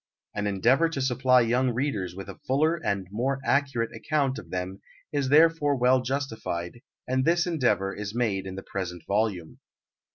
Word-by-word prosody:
An 105 0 -2
endeavour 120 - +3
to 160 - -4
supply 130 -1 +3
young 125 +3 +2
readers 110 -10 -2
with 95 0 -8
a 100 - -10
fuller 155 +5 +2
and 95 -2 -1
more 130 +6 -1
accurate 135 -6 0
account 135 +3 0
of - - -13
them 95 +1 -4 0.3
is 140 -3 -1
therefore 150 -1 +4
well 130 0 +3
justified, 120 -7 -4 0.3
and 130 +1 +1
this 170 +3 +3
endeavour 125 - +1
is 105 +1 -6
made 100 -6 0
in 95 - -6
the 95 - -7
present 90 -3 -5
volume. 100 -5 -1
125 Hz, 165 wpm, -26 LUFS, 100-140 Hz, 0.3 s, therefore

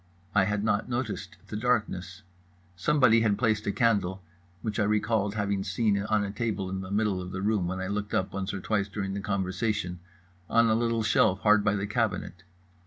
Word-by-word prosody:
I 100 -2 +4
had 100 +1 -1
not 105 +1 0
noticed 120 -3 -3
the - - -5
darkness. 105 -5 -1 0.5
Somebody 115 +3 +4
had 105 -3 +2
placed 110 -3 +1
a - - +2
candle 100 -3 +1 0.4
(which 110 -1 -2
I - - +3
recalled 105 0 +1
having 100 -2 -1
seen 100 +1 +1
on 105 0 +1
a 100 - -3
table 100 -3 -2
in 95 0 -3
the 95 - -7
middle 100 -2 0
of 90 0 -7
the 95 +1 -4
room 105 -4 +1
when 95 +1 -3
I 95 - -3
looked 105 +1 -3
up 95 - -1
once 95 0 -3
or 95 - -5
twice 100 -1 0
during 100 -1 -4
the 100 - -3
conversation) 95 -1 -2 0.5
on 115 0 +4
a - - +4
little 115 0 +1
shelf 100 -3 +3
hard 105 -1 +5
by 105 0 +2
the 100 0 -1
cabinet. 105 -5 -2
105 Hz, 200 wpm, -28 LUFS, 95-110 Hz, 0.5 s, hard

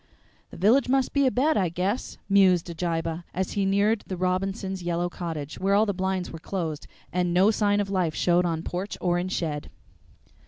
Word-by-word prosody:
"The - - -11
village 230 +9 +4
must 265 0 +2
be 280 -1 +3
abed, 270 +5 +2
I 185 -4 +2
guess," 185 +8 -2
mused 185 -3 +4
Abijah, 165 0 -2
as 190 +1 -1
he 200 -2 0
neared 205 +3 +2
the 185 - -4
Robinsons' 190 +1 -1
yellow 175 0 -1
cottage, 160 -5 -5
where 195 +1 +2
all 210 +2 +4
the 200 - -1
blinds 190 -1 -2
were 165 - -8
closed 165 -4 -4 0.3
and 180 -1 0
no 195 +4 +5
sign 205 -2 +2
of 200 -1 -2
life 180 -5 0
showed 175 0 +3
on 165 -2 -1
porch 185 +4 -4
or 175 -1 +1
in 180 - -2
shed. 155 -5 -3
185 Hz, 190 wpm, -26 LUFS, 175-200 Hz, 0.3 s, no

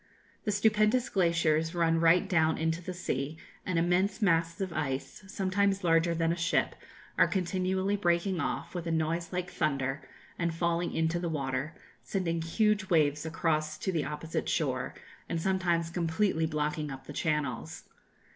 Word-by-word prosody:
The 210 - +1
stupendous 215 +3 +3
glaciers 165 -2 +2
run 165 -1 +2
right 170 +4 +4
down 160 -4 +2
into 160 +1 -1
the 185 - -5
sea, 155 -4 -3 0.3
and 185 -2 0
immense 180 +4 +2
masses 165 -5 +2
of 190 -3 -3
ice, 145 +3 -3
sometimes 195 +1 0
larger 165 0 +3
than 165 0 +1
a - - 0
ship, 170 -1 +1 0.5
are - - +7
continually 190 +1 0
breaking 175 -1 +1
off, 165 +1 -3
with 175 -2 -4
a - - 0
noise 165 +1 -1
like 180 0 -3
thunder, 140 -4 -1 0.4
and 170 -1 0
falling 170 0 0
into 165 +1 +1
the 170 -1 -2
water, 140 0 -2 0.3
sending 170 -4 -2
huge 210 +4 +1
waves 150 -2 +2
across 155 -1 0
to 190 - -2
the 160 -5 -1
opposite 150 +2 -3
shore, - - -1 0.3
and 165 - -1
sometimes 175 -2 0
completely 165 0 +1
blocking 150 -1 -2
up 135 -1 -8
the 145 - -8
channels. 150 -6 -2
170 Hz, 155 wpm, -30 LUFS, 160-185 Hz, 0.5 s, are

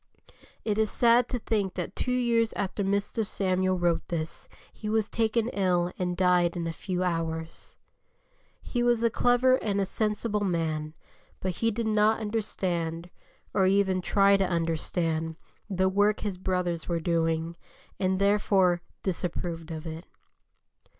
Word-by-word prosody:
It 215 -1 0
is 220 -1 +2
sad 235 +1 +4
to 250 - -1
think 210 -5 -1
that 180 0 -4
two - - -2
weeks 230 -2 +2
after 200 0 -2
Mr. 200 +3 0
Samuel 185 -2 0
wrote 175 -2 0
this 165 -1 -3 0.2
he 210 - -6
was 220 -1 +1
taken 225 0 0
ill 180 -4 +1
and 180 -1 -1
died 180 -1 +3
in 170 - -2
a 165 - -2
few 185 +1 -3
hours. 165 -2 -3 0.9
He 240 - -2
was 240 -1 +2
a 230 - +3
clever 245 +2 +4
and 205 -5 -1
a 195 - +2
sensible 210 +1 -1
man, 160 -4 -1 0.4
but 185 -2 -3
he 230 - +2
did 230 +1 -2
not 215 0 +3
understand, 180 -6 -2 0.4
or 190 -2 +3
even 190 -1 +2
try 200 +2 +4
to 195 - +2
understand, 165 -1 -1 0.3
the 190 -1 +1
work 205 +2 +2
his 200 -4 -3
brothers 180 -3 -2
were 170 -1 0
doing, 165 0 0 0.4
and, 190 0 +1
therefore, 195 -3 +3 0.2
disapproved 170 -2 -3
of 160 -1 -6
it. 160 +2 -7
190 Hz, 150 wpm, -28 LUFS, 170-210 Hz, 0.9 s, sad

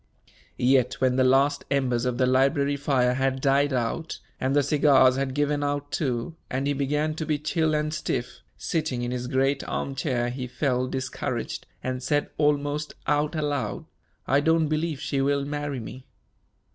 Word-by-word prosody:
Yet, 130 0 +3
when 130 -1 +2
the 130 - +3
last 135 +2 +3
embers 130 -3 +1
of 125 -1 -1
the 130 - +3
library 140 +2 +2
fire 135 -3 +2
had 135 0 0
died 140 +2 +2
out, 130 +6 -2 0.2
and 130 +2 0
the 145 - +4
cigars 140 -3 +5
had 135 -1 -2
given 145 0 +1
out 145 0 -2
too, 130 +2 -2
and 130 +2 -2
he 145 - +1
began 150 +3 0
to 160 - -4
be 155 -1 0
chill 155 +1 0
and 150 0 -1
stiff, 140 -5 -3 0.2
sitting 155 -7 -2
in 120 - -2
his 125 0 -3
great 135 +1 +1
arm 135 - -2
chair, 125 -3 -1
he 125 0 -5
felt 130 -1 -1
discouraged, 130 -1 -4 0.2
and 130 0 -3
said 145 +3 0
almost 145 0 0
out 150 +2 +1
aloud, 145 -9 -2 0.4
"I 140 - +3
don't 160 +1 +3
believe 155 -1 -1
she 140 -2 -1
will 140 0 +1
marry 145 -2 -3
me." 125 +3 -9
140 Hz, 170 wpm, -26 LUFS, 130-145 Hz, 0.4 s, cigars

